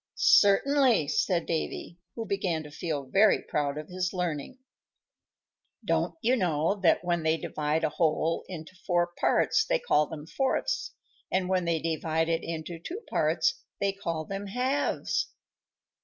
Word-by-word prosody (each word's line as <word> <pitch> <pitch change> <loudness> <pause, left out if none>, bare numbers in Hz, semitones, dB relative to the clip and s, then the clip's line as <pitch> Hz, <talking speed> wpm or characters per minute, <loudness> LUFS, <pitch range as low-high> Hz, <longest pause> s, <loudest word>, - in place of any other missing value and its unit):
"Certainly," 230 - +4
said 170 +2 +1
Davy, 170 +1 -3 0.2
who 225 - -4
began 185 -6 -1
to 150 - -11
feel 150 -2 -3
very 200 +10 +4
proud 145 -1 -1
of 150 0 -6
his 185 +1 -2
learning. 180 - -3 1.3
"Don't - - 0
you 245 +3 +4
know 170 - +1
that 175 - +4
when 175 -1 0
they 160 0 +2
divide 155 -1 -2
a - - +2
whole 160 +1 0
into 175 0 -8
four 175 -1 +2
parts - - +3
they - - +1
call 475 - +2
them 150 -1 -8
fourths, 270 - -1 0.4
and 185 0 0
when 185 -2 +1
they 165 -1 +1
divide 160 0 -1
it 165 0 +1
into 165 0 -5
two 360 - -6
parts - - +1 0.2
they 200 -1 +1
call 165 -5 -4
them 195 +2 -5
halves?" 255 +7 0
175 Hz, 150 wpm, -28 LUFS, 160-200 Hz, 1.3 s, Certainly